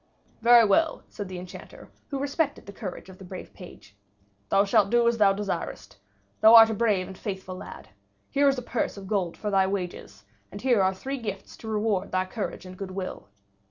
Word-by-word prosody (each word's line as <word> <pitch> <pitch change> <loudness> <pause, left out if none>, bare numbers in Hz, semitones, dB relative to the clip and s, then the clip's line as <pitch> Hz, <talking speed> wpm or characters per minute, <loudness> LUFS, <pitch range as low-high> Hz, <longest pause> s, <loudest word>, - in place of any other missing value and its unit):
"Very 235 0 +7
well," 310 +11 +2
said 205 - -6
the 185 -1 -7
Enchanter, 180 0 -11 0.2
who 280 - -3
respected 285 +2 -1
the 200 - -10
courage 190 -3 -7
of 190 -1 -13
the - - -10
brave 185 0 -9
page, 105 - -13 0.5
"thou 195 +1 +4
shalt 200 0 +3
do 235 +1 +3
as 235 -1 +1
thou 200 -2 +6
desirest. 195 -3 -4 0.4
Thou 220 +1 +8
art 225 -1 +9
a - - -1
brave 210 -4 +1
and 190 +1 -9
faithful 190 -2 -6
lad. - - -10 0.4
Here 285 0 +4
is 270 - 0
a 250 - -4
purse 235 -3 -2
of 195 - -8
gold 190 -4 -1
for 210 - -3
thy 190 -1 +3
wages, 180 - -5 0.3
and 200 - -8
here 240 -3 +3
are 190 0 +2
three 270 +7 -5
gifts 200 -4 -6
to 225 - -10
reward 215 -3 -1
thy 185 0 +1
courage 200 0 -5
and 185 0 -9
good 195 0 -6
will." 185 0 -6
200 Hz, 205 wpm, -26 LUFS, 185-230 Hz, 0.5 s, art